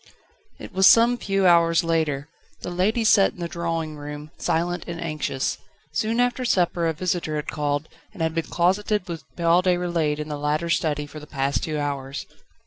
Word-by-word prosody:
It - - -10
was 190 +1 +6
some 235 +1 +6
few 195 -4 0
hours 170 -1 +5
later. 155 -4 0 0.3
The - - -5
ladies 215 +6 +1
sat 195 -2 +5
in - - -17
the 170 - -2
drawing 165 -2 -3
room, 150 +1 -8
silent 175 +2 -1
and 170 -1 -5
anxious. 155 -5 -2 0.3
Soon 225 +7 0
after 245 +1 +1
supper 175 -7 +1
a 165 - 0
visitor 170 -1 -2
had 150 - -3
called, 145 0 -1 0.2
and 185 -6 -4
had 160 0 0
been 165 0 -1
closeted 190 +3 +1
with 165 -2 -6
Paul 170 +1 +3
Déroulède 175 -4 +1
in 150 0 -5
the 150 -1 -5
latter's 155 +3 +1
study 150 -2 -1
for 155 +1 -10
the 150 - -12
past 140 -1 -1
two 155 -2 -2
hours. 140 -2 -3
165 Hz, 185 wpm, -24 LUFS, 150-180 Hz, 0.3 s, was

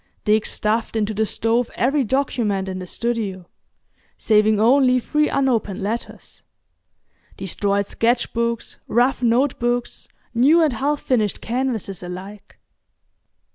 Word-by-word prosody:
Dick 215 0 +2
stuffed 225 +2 -1
into 215 -1 0
the 215 +1 0
stove 230 +3 0
every 275 +3 +1
document 225 -6 -1
in 185 -1 -4
the 185 - -7
studio—saving 215 0 -2
only 255 +2 +4
three 300 +4 0
unopened 235 -7 0
letters; 220 +4 -5 1.0
destroyed 200 +2 -1
sketch 235 +4 0
books, 235 -1 -2
rough 245 +3 +2
note 245 +3 +2
books, 240 0 -2 0.3
new 275 +8 +5
and 300 -5 +2
half 285 +5 -1
finished 220 -6 0
canvases 230 -6 -3
alike. 190 +3 -9
230 Hz, 115 wpm, -21 LUFS, 205-250 Hz, 1.0 s, new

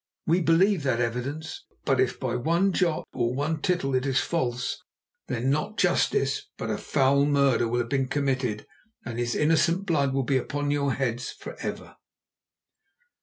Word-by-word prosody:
We 175 +3 +2
believe 175 +3 +3
that 130 -4 0
evidence, 125 +7 -3 0.2
but 135 -2 +2
if 130 -1 +1
by 125 -2 -2
one 170 +9 +1
jot 170 -4 +1
or 120 0 0
one 150 +3 -1
tittle 175 -7 0
it 130 0 +1
is 130 -1 +2
false, 125 -6 -2 0.5
then 125 +3 0
not 155 +10 -1
justice, 420 - +1
but - - -3
a - - -2
foul 140 0 +2
murder 140 -5 +3
will 120 +1 0
have 120 - -5
been 135 -2 0
committed 130 -6 -1 0.4
and 120 0 -5
his 120 0 -1
innocent 165 +4 +2
blood 145 -7 +1
will 135 0 0
be 135 +1 +1
upon 145 +2 -2
your 140 -2 +1
heads 125 -1 -2
for - - -9
ever. - - -6
140 Hz, 170 wpm, -26 LUFS, 125-160 Hz, 0.5 s, believe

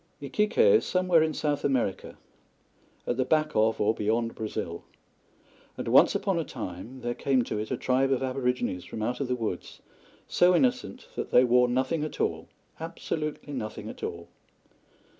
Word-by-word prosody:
Iquique 210 +10 -1
is 470 -2 +6
somewhere 180 -3 +3
in 160 0 +2
South 145 -1 -1
America 125 -9 -1 0.9
at 120 - -1
the 130 - +2
back 155 +3 +1
of 110 -1 +2
or 105 +1 +3
beyond 115 +2 0
Brazil 95 -6 -5 0.9
and - - -5
once - - +6
upon - - 0
a - - 0
time 110 +9 -7
there 120 0 -2
came 130 0 +1
to 105 - -3
it 105 - -4
a 130 - -1
tribe 130 +2 +1
of 135 0 +1
Aborigines 125 -7 -1
from 110 - -6
out 125 +3 -2
of 140 - -1
the 125 - 0
woods, 110 -7 -5 0.5
so 180 0 +4
innocent 255 +3 0
that - - -4
they 125 - +6
wore 125 0 +4
nothing 130 +5 0
at 155 - -6
all - - -1 0.3
absolutely 155 -2 -4
nothing 110 -5 -5
at - - -10
all. - - -5
130 Hz, 170 wpm, -28 LUFS, 115-155 Hz, 0.9 s, is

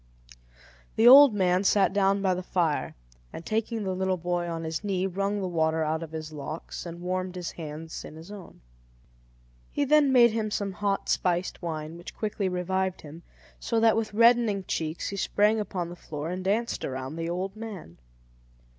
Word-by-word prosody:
The 225 +2 +5
old 270 -2 +9
man 185 -1 +2
sat 195 -1 +3
down 200 0 +2
by 190 -1 +3
the 180 - -3
fire, 170 -4 -1 0.4
and 165 - -9
taking 225 0 -1
the 190 -1 -2
little 190 0 0
boy 175 0 -2
on 165 -1 -4
his 160 +3 -4
knee, 190 -2 -1
wrung 195 +2 -1
the 190 - -2
water 160 -2 +1
out 160 +1 -1
of 165 - -6
his 155 -1 -6
locks 155 +4 -6
and 170 0 -8
warmed 185 0 -2
his 175 -2 -4
hands 160 0 -7
in - - -10
his 165 +5 -11
own. 200 -4 -11 1.1
He 285 - -1
then 295 -1 +4
made 240 -3 +6
him 215 -1 -1
some 200 -1 -2
hot 200 +1 -2
spiced 180 0 0
wine, 160 -1 -5
which 175 - -10
quickly 210 -3 -2
revived 185 +1 -1
him; 155 +2 -11 0.4
so 230 - 0
that 225 -1 +4
with 220 -1 -1
reddening 230 -3 +4
cheeks, 160 -2 -3
he 200 - -5
sprang 210 +3 +2
upon 180 -4 -3
the 175 - -8
floor 155 -1 -6
and 185 +1 -4
danced 220 +5 -1
around 130 +2 -4
the 165 0 -3
old 185 +3 -3
man. 210 - -9
185 Hz, 185 wpm, -27 LUFS, 165-210 Hz, 1.1 s, old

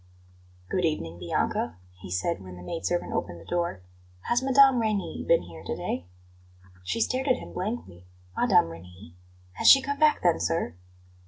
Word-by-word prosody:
"Good 185 - 0
evening, 85 - -2
Bianca," 85 0 -1 0.2
he 95 - -10
said 95 - -1
when 90 -1 -10
the 90 - -11
maid 165 - -4
servant 175 0 -2
opened 85 -2 -3
the 85 - -14
door. 170 - -2 0.4
"Has 240 - +1
Mme. 270 -1 +5
Reni 215 -4 -1
been 170 - +4
here 85 -2 -11
to - - -3
day?" 85 +1 -4 0.8
She 90 - -2
stared 260 +4 0
at 255 - +4
him - - -10
blankly 180 - -5 0.3
"Mme. - - +4
Reni? 90 +2 -12 0.4
Has - - +1
she 275 - +10
come 280 +1 -4
back, 305 -1 +4
then, 175 -2 +3
sir?" 165 - -1
165 Hz, 170 wpm, -27 LUFS, -, 0.8 s, she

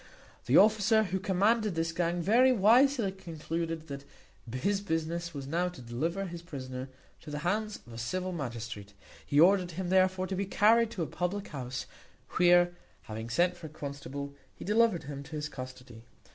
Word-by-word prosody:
The - - +5
officer 220 +1 +5
who 190 -1 -2
commanded 205 +2 +2
this 165 0 0
gang 170 0 -1
very 245 +7 +5
wisely 240 0 +4
concluded 165 -3 -5
that 140 -1 -7 0.5
his 195 - 0
business 170 -1 -2
was 140 -4 -6
now 170 +6 0
to 175 - -12
deliver 155 +11 -2
his 170 -2 -7
prisoner 130 -5 -7 0.3
into - - -11
the 150 - -4
hands 210 +3 0
of 120 - -14
the 115 - -8
civil 185 +11 -2
magistrate. 115 - -6 0.3
He 145 - +1
ordered 180 +1 +5
him, 180 +1 -3
therefore, 185 0 +3
to 190 - -3
be 195 +1 -2
carried 225 +3 +4
to 185 -6 -3
a - - -1
public 185 +5 -3
house, 130 -3 -5 0.4
where, 175 0 +5 0.3
having 110 +1 -6
sent 175 +9 +2
for 170 -2 -9
a - - -11
constable, 140 -1 -6 0.2
he - - -9
delivered 215 -5 +3
him 140 -1 -6
to 140 - -13
his 150 0 -3
custody. 130 -4 -9
170 Hz, 175 wpm, -30 LUFS, 140-195 Hz, 0.5 s, The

